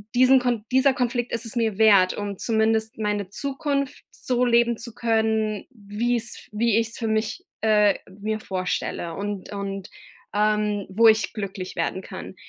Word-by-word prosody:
diesen 255 +2 +6
Kon 245 -4 -1
dieser 265 +1 +4
Konflikt 245 -1 -1
ist 230 0 -1
es 225 - -4
mir 225 -3 0
wert, 200 -4 +5
um 205 -2 -4
zumindest 220 -1 0
meine 210 -2 -1
Zukunft 280 +3 -3
so 250 -1 0
leben 235 -1 +3
zu 235 -1 -7
können, 220 -2 0
wie 225 +2 -2
es 230 0 -2
wie 220 +1 +2
ich 225 -1 +1
es - - -6
für 225 - -2
mich, 220 - -1 0.2
äh, 210 -2 +4 0.3
mir 215 +1 -2
vorstelle 185 -3 -3
und 200 0 -5
und, 195 -1 -5 0.5
ähm, 210 -1 +1
wo 225 +4 +5
ich 220 0 +3
glücklich 195 -3 -5
werden 190 - -2
kann.“ - - -8
220 Hz, 165 wpm, -24 LUFS, 205-235 Hz, 0.5 s, diesen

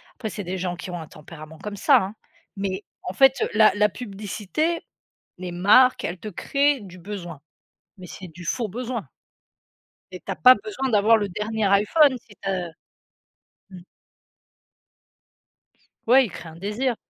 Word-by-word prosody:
après 225 -4 -5
c'est 205 0 -6
des 185 +1 -4
gens 180 -1 -3
qui 175 +1 -8
ont 175 - -5
un 160 - -8
tempérament 155 0 -12
comme 210 -1 -6
ça - - +5
hein, 195 +3 -2 0.4
mais 195 0 -3 0.2
en 180 - -5
fait 270 +5 +4
la 215 0 +6
la 210 0 +4
publicité, 215 - -3 0.6
les 180 -1 -5
marques, 210 +9 +5
elles 180 +1 -4
te 215 - -6
créent 280 +7 +1
du 185 -3 -12
besoin, 175 -5 -8 0.6
mais 185 - -11
c'est 185 - -9
du 175 +2 -12
faux 230 +5 -1
besoin. 235 - -4 1.1
Et 185 - -8
tu - - -4
as - - -3
pas 255 0 +7
besoin 270 -11 -3
d'avoir 220 +1 +5
le 205 -2 -2
dernier 215 +3 -2
iPhone 215 +9 +4
si 210 -3 -19
tu 195 - -3
as, 180 -2 -2
heu - - -12 1.0
mmh. 185 - -11 2.3
Ouais, 260 +2 +6
ils - - -7
créent 165 - -9
un 160 - -13
désir. 210 +8 -2
205 Hz, 170 wpm, -24 LUFS, 180-240 Hz, 2.3 s, pas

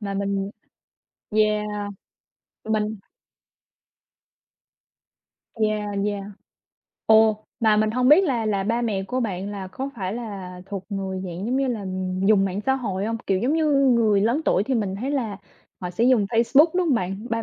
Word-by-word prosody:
Mà 200 -2 -4
mình 200 0 -1 0.8
yeah. 215 -1 +2 1.0
Mình 215 0 -1 2.6
Yeah, 215 -2 0 0.2
yeah. 205 -1 -3 0.8
Ồ, 220 -1 +5 0.2
mà 220 -2 +4
mình 215 0 +2
hông 250 +2 +2
biết 320 +7 +7
là 240 -9 0
là 200 -2 0
ba 230 +3 0
mẹ 210 -5 -1
của 255 +6 -3
bạn 200 -4 -3
là 200 -2 -5
có 270 +8 -5
phải 190 -1 -3
là 195 -6 -6
thuộc 195 -1 -6
người 190 -2 -3
dạng, 180 +3 -5
giống 255 +2 0
như 270 -1 +1
là, 220 -5 -3 0.4
dùng 205 -2 +5
mạng 195 +1 -2
xã 265 - +4
hội 200 -7 -3
hông? 230 - -1
Kiểu, 195 - +2
giống 245 +8 0
như 320 -1 +2
người 235 -7 +4
lớn 235 +9 +2
tuổi - - +3
thì 265 - -1
mình 205 -5 -1
thấy 255 +6 -3
là 235 -8 -2 0.4
họ 180 -1 -4
sẽ 225 +6 0
dùng 250 -4 +4
Facebook, 235 +7 +4
đúng 365 -1 +1
hông 295 - +3
bạn? 195 +1 -3
Ba 230 0 0
215 Hz, 170 wpm, -23 LUFS, 195-240 Hz, 2.6 s, biết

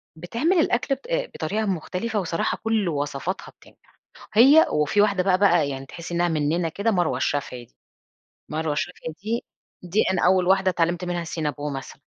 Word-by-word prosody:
بتعمل 235 - 0
الأكل 270 -2 +1
ب - - -19 0.3
بطريقة 210 +7 -2
مختلفة 195 +4 -2
وصراحة 165 -2 -1
كل 220 -5 +1
وصفاتها 145 +4 -3
بتنجح، - - -24 0.3
هي 275 +9 +7
وفي 150 +7 +2
واحدة 200 -3 +2
بقى 185 -1 +3
بقى 175 -7 +3
يعني 135 0 -5
تحسي 170 +4 -8
إنها 175 0 +2
مننا 160 +1 0
كده، 205 +7 -1
مروة 175 -9 +1
الشافعي 130 -3 -2
دي، - - -34 0.7
مروة 155 0 -2
الشافعي 160 +1 -4
دي 230 +3 -2 0.4
دي 180 +4 +1
أنا 180 - +1
أول 185 -1 +3
واحدة 190 0 +3
اتعلمت 175 +1 0
منها 175 -1 -2
الCinnabon 150 -3 -3
مثلًا، 135 - -9
175 Hz, 165 wpm, -24 LUFS, 155-200 Hz, 0.7 s, هي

